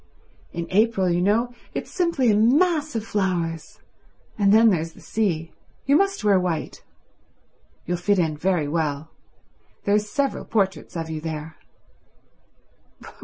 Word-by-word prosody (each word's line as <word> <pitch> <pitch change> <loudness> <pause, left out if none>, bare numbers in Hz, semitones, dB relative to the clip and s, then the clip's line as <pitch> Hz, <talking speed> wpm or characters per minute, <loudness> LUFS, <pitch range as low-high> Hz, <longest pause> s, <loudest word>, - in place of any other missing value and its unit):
"In 170 0 -4
April, 210 -1 +2
you 175 +1 +1
know, 225 +6 +1 0.2
it's - - -4
simply 335 - +1
a - - +3
mass 300 - +2
of 225 -1 -2
flowers. 170 -7 -2 0.6
And 200 -2 +3
then 225 +1 +6
there's 165 -2 -2
the - - -16
sea. 170 -7 -2 0.3
You 280 - +4
must 390 - +1
wear 200 -3 +4
white. 175 -4 -3 1.0
You'll 175 +1 -1
fit 200 +3 +1
in 160 -4 +1
very 165 -1 0
well. 150 -1 -2 0.7
There 200 - +1
are 210 - +5
several 270 +7 -2
portraits 195 -4 -1
of 160 -1 -4
you 155 -1 -4
there." 160 -1 -6
190 Hz, 140 wpm, -23 LUFS, 165-225 Hz, 1.0 s, then